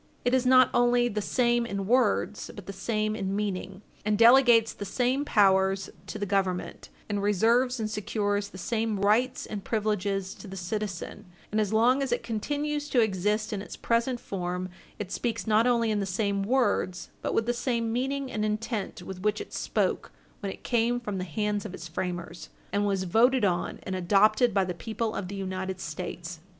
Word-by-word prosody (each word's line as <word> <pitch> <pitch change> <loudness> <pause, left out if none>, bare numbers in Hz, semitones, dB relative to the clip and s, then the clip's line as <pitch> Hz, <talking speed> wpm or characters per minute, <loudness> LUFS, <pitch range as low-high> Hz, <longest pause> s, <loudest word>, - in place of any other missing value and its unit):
It 245 - +2
is 260 -1 +3
not 255 -1 +6
only 245 0 +3
the 210 -1 -2
same 240 +2 +2
in 200 -4 -3
words, 230 -2 +1
but 205 - -9
the 200 - -6
same 215 +2 -1
in 195 -2 -2
meaning, 195 -1 -3 0.2
and 210 0 +1
delegates 235 -1 +6
the - - -7
same 250 +7 0
powers 195 -5 +3 0.2
to - - -5
the 205 - -2
Government, 190 -2 -1 0.2
and 205 -1 -1
reserves 230 +5 +2
and 220 - -1
secures 205 -1 -1
the 185 - -11
same 220 +2 -1
rights 220 +6 +2
and 205 -2 -6
privileges 200 -3 -1
to - - -12
the 195 0 -8
citizen; 205 +1 -4 0.3
and 215 +1 +2
as 210 -2 -1
long 240 +5 +4
as 270 -3 -1
it 240 - 0
continues 290 +6 -2
to 255 - +3
exist 210 +1 +1
in 200 - -3
its 205 - -8
present 235 +2 0
form, 180 -4 -4 0.3
it 200 -2 -6
speaks 235 +2 -2
not 220 +2 +3
only 230 -2 +2
in 210 - +1
the 195 - -2
same 200 +1 0
words, 205 -5 0
but - - -2
with 225 - +2
the 240 - +1
same 235 -2 -1
meaning 270 +2 -2
and 215 - -2
intent 215 -3 -3
with 185 0 -8
which 210 +1 +1
it - - -8
spoke - - -1 0.3
when 200 - -3
it - - -11
came 240 0 +1
from 210 -5 -4
the - - -2
hands 205 +4 -2
of 185 - -6
its 170 - -8
framers 175 0 -5 0.2
and 205 0 +1
was 195 -2 0
voted 230 +6 +3
on 175 -2 -1
and 190 - -3
adopted 210 +6 +4
by 195 -1 +2
the 180 - -3
people 220 +6 -3
of 200 - -4
the 200 - -6
United 190 -1 -4
States. 170 +1 -6
210 Hz, 195 wpm, -28 LUFS, 195-235 Hz, 0.3 s, not